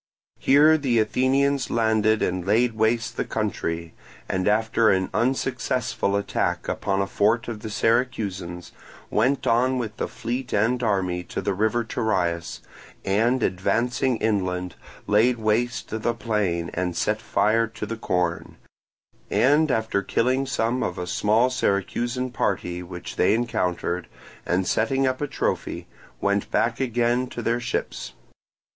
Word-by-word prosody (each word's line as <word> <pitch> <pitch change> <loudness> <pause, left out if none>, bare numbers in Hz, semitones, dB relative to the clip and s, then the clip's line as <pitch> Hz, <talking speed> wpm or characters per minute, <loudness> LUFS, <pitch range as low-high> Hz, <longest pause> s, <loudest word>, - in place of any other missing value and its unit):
Here 150 +3 +5
the 130 -5 +1
Athenians 130 +5 +2
landed 110 -1 +2
and 90 0 -1
laid 115 +5 +2
waste 110 +1 0
the - - +1
country, 85 0 -3 0.3
and 95 0 -1
after 110 +1 +3
an 95 -1 +1
unsuccessful 125 -4 0
attack 100 0 -1
upon 95 0 0
a - - -1
fort 110 +4 +1
of 115 -3 -5
the 110 - -6
Syracusans, 100 -7 -1 0.4
went 130 +6 +1
on 125 +3 +2
with 110 -3 -4
the - - -2
fleet 120 +3 -4
and 115 +4 +2
army 95 -5 0
to - - -5
the 100 - -1
river 110 +4 +1
Terias, 85 -7 -1 0.4
and 115 +6 +2
advancing 115 +7 0
inland 90 -5 -1 0.3
laid 115 +4 +3
waste 115 +2 0
the 110 +1 -1
plain 100 -8 -1
and 90 -1 -2
set 105 0 0
fire 110 +1 +2
to 110 -1 -6
the 115 +2 -4
corn; 90 -5 -2 0.7
and 145 +4 +3
after 110 -5 0
killing 130 +6 0
some 125 -1 0
of 90 - -2
a 90 - -3
small 110 +7 +2
Syracusan 120 +3 -1
party 90 -6 -1
which 90 0 -8
they - - +4
encountered, 90 -6 -1 0.4
and 90 +1 +1
setting 135 +8 +1
up 130 +1 -1
a 145 - 0
trophy, - - -2 0.3
went 100 0 0
back 115 0 +1
again 120 0 +1
to 120 -1 -6
their 120 +1 +1
ships. 120 - -4
110 Hz, 140 wpm, -24 LUFS, 100-120 Hz, 0.7 s, Here